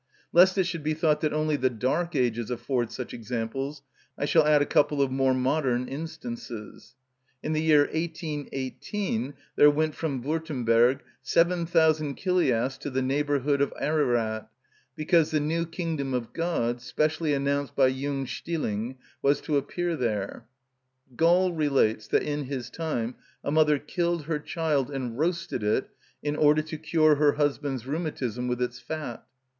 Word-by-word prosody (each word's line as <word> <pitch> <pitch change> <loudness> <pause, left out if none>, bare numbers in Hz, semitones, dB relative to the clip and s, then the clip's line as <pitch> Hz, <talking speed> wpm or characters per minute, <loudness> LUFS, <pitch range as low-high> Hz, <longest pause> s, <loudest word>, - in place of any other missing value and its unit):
Lest 185 +2 +6
it 190 - +4
should 170 -2 -3
be 155 +1 -1
thought 155 -1 +2
that 155 - +1
only 155 0 +1
the 130 -2 +2
dark 140 +9 -1
ages 120 -3 0
afford 125 -1 -1
such 125 - -6
examples, 125 +5 -4 0.3
I - - -1
shall 155 0 +4
add 150 -1 +6
a 145 - +2
couple 145 0 +2
of 135 -2 +2
more 130 0 +2
modern 130 -1 +1
instances. 160 - -7 0.5
In 155 - -1
the 155 - +1
year 155 -2 +5
1818 150 - -3 0.2
there 145 - +7
went 155 +1 +1
from 140 -7 -3
Würtemberg 130 -4 +2 0.2
7000 165 -4 +2
Chiliasts 135 -9 +1
to - - -4
the 130 -1 -1
neighbourhood 140 +1 +1
of 140 - +2
Ararat, 120 -8 0 0.5
because 160 0 +3
the 155 -1 +1
new 165 +3 -1
kingdom 160 -6 -3
of 120 -2 -4
God, 120 -8 -1
specially 155 +4 0
announced 140 0 -1
by 135 - +5
Jung 135 +1 -1
Stilling, 130 -6 -3 0.2
was 140 +1 +3
to 155 - -1
appear 170 +5 -1
there.(17) 130 +3 -6
Gall 175 +2 +4
relates 140 -9 +1
that - - +2
in 145 -1 -2
his 130 -3 -5
time 130 -8 -2 0.3
a - - -2
mother 150 -1 +4
killed 170 +2 -1
her 150 0 -2
child 150 -4 -1
and 130 -3 -4
roasted 170 -5 -1
it 105 0 0 0.3
in 145 0 -1
order 150 0 +4
to 155 0 -6
cure 155 -1 +3
her 145 -1 +4
husband's 145 -4 -1
rheumatism 135 -6 -3
with 125 0 0
its 125 0 -4
fat. 125 -1 -6
145 Hz, 155 wpm, -27 LUFS, 130-160 Hz, 0.5 s, there